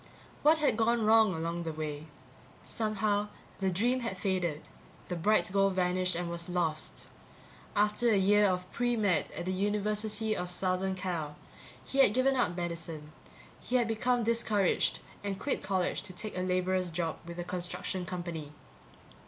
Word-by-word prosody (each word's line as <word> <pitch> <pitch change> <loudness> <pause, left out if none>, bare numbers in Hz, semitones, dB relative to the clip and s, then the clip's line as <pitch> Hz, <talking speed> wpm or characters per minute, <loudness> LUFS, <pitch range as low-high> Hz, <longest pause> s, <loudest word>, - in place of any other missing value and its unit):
What 310 +2 +6
had 300 -7 +2
gone 230 0 +2
wrong 220 -4 +5
along 165 +1 -2
the 165 -1 -3
way? 155 0 -5 0.6
Somehow, 210 -1 0 0.3
the 190 -1 +1
dream 235 +8 +1
had 230 -6 -3
faded, 180 -5 -1 0.5
the 180 - -1
bright 180 +1 +2
goal 195 0 +4
vanished 185 -1 +1
and 175 0 -2
was 170 +1 -4
lost. 165 -3 -2 0.7
After 210 +3 +3
a 215 - +4
year 205 +2 +5
of 180 -1 0
pre 240 0 +1
med 200 -8 +1
at 175 - -4
the 185 - -1
University 210 +2 0
of 180 -2 -3
Southern 185 +1 0
Cal, 170 -5 -3 0.5
he 275 - -2
had 210 -6 +6
given 265 +1 +3
up 215 -8 +1
medicine; 165 -3 -4 0.5
he 250 - -3
had 240 -2 +3
become 240 +2 +1
discouraged 220 -4 +1 0.2
and 200 -1 -2
quit 285 - -1
college 190 -2 0
to 185 - -9
take 210 +4 -5
a 180 - -1
laborer's 185 0 +1
job 165 -1 -2
with 170 0 -7
a 175 - -2
construction 180 +1 -3
company. 170 -4 -5
185 Hz, 160 wpm, -31 LUFS, 175-215 Hz, 0.7 s, What